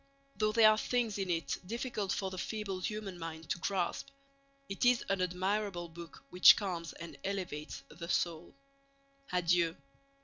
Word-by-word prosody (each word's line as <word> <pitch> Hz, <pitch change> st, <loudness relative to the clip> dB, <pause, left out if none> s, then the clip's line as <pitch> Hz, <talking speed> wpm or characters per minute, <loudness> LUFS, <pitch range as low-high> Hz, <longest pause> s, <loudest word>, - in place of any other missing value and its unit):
Though 215 Hz, 0 st, +1 dB
there 220 Hz, -1 st, +7 dB
are 215 Hz, -, +1 dB
things 230 Hz, -5 st, 0 dB
in 190 Hz, -2 st, -2 dB
it 165 Hz, -2 st, -1 dB
difficult 215 Hz, -1 st, -3 dB
for 190 Hz, -1 st, -1 dB
the 185 Hz, -, -6 dB
feeble 205 Hz, -1 st, -3 dB
human 200 Hz, -2 st, -4 dB
mind 165 Hz, -1 st, -6 dB
to -, -, -1 dB
grasp, 190 Hz, +7 st, -1 dB, 0.6 s
it 195 Hz, -, -3 dB
is 245 Hz, -1 st, +4 dB
an 195 Hz, -1 st, +1 dB
admirable 185 Hz, 0 st, -1 dB
book 165 Hz, -1 st, -11 dB
which 180 Hz, 0 st, +9 dB
calms 175 Hz, -5 st, -3 dB
and 170 Hz, 0 st, -9 dB
elevates 180 Hz, -6 st, -4 dB
the 170 Hz, +2 st, -9 dB
soul. 170 Hz, -3 st, -1 dB, 0.8 s
Adieu! 175 Hz, -2 st, +2 dB
185 Hz, 150 wpm, -33 LUFS, 170-210 Hz, 0.8 s, which